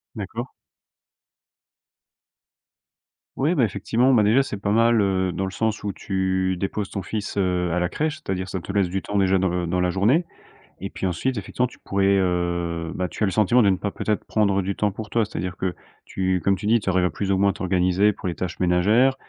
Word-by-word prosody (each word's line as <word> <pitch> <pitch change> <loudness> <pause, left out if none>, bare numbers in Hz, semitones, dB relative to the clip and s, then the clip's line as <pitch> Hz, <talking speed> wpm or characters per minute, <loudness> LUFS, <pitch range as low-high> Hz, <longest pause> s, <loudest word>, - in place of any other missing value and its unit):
D'accord. - - -5 2.9
Ouais, 155 +6 +1
beh, 135 - +3
effectivement, 115 +5 +1
bah 110 -4 +5
déjà, 120 +7 +4
c'est 105 - -5
pas 100 0 -1
mal, 115 +1 +4
heu, 95 -2 +1
dans 95 +2 -2
le 95 - -4
sens 110 0 -2
où 100 - -2
tu 95 -1 -1
déposes 95 +2 -3
ton 100 - -4
fils, 100 +1 -5
heu, 90 -2 +1
à 90 - 0
la 90 - +1
crèche. 155 - -2
C'est-à-dire 95 -6 -4
ça 95 - -3
te 100 - -7
laisse 100 -3 +2
du 95 +1 -2
temps 105 - -3
déjà 95 -1 +3
dans, 95 -1 +1
heu, 90 -1 -1
dans 90 +2 0
la 90 0 +2
journée 115 - +2 0.5
et - - -5
puis, - - -5
ensuite, 105 +8 -1
effectivement, 125 +5 -1
tu - - -16
pourrais, 100 0 +2
heu, 85 -2 -1
bah, 90 - -1
tu - - -11
as - - +5
le - - -1
sentiment 115 +5 +4
de 100 - +4
ne 95 - +3
pas 100 - -3
peut-être 105 +1 -2
prendre 100 -3 +1
du 95 +1 -3
temps 105 -1 0
pour 105 +1 -8
toi. 115 0 +2
C'est-à-dire 90 -3 -5
que 95 -2 -2 0.3
tu 95 -1 -1
comme 100 0 +3
tu 100 - -8
dis, 115 +1 +4
tu 95 - -3
arrives 90 -1 +2
à - - +2
plus 100 -1 -3
ou 95 - +2
moins 100 +1 +3
à - - -9
t'organiser 95 +1 +2
pour 95 - -6
les 85 - -4
tâches 90 -2 -5
ménagères. 105 +9 +3
95 Hz, 225 wpm, -23 LUFS, 90-105 Hz, 2.9 s, bah